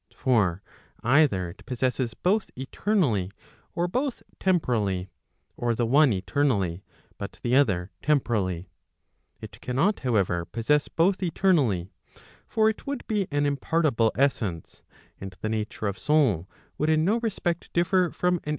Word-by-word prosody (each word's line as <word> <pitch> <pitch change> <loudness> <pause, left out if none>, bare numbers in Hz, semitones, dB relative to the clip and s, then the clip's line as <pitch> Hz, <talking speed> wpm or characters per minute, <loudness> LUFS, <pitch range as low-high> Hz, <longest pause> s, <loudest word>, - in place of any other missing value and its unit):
For 100 - +1 0.4
either 120 - +3
it - - -16
possesses 125 -1 -1
both 205 +4 +1
eternally, 130 - 0 0.5
or 175 +1 0
both 255 +7 -2 0.2
temporally; 110 - 0 0.4
or 120 -1 -1
the 120 - 0
one 140 +3 +5
eternally, 100 - 0 0.4
but - - -7
the 120 +1 +2
other 100 -9 +2
temporally. 105 - 0 0.7
It - - -10
cannot 140 +12 +1
however, 100 -9 +1
possess 130 +9 +1
both 185 +4 +1
eternally: 145 - +1 0.6
for 220 -1 +2
it 220 +4 -2
would 280 -2 -4
be 205 -4 -1
an 145 0 0
impartible 140 -5 +1
essence, 110 - -1 0.4
and 95 -1 -8
the 110 - -2
nature 110 0 -3
of 100 0 -2
soul 130 - +2 0.3
would 150 - +1
in 155 0 +3
no 215 +5 +2
respect 195 -7 -2
differ 180 +1 +2
from 180 +1 0
an. - - -6
130 Hz, 135 wpm, -26 LUFS, 100-170 Hz, 0.7 s, one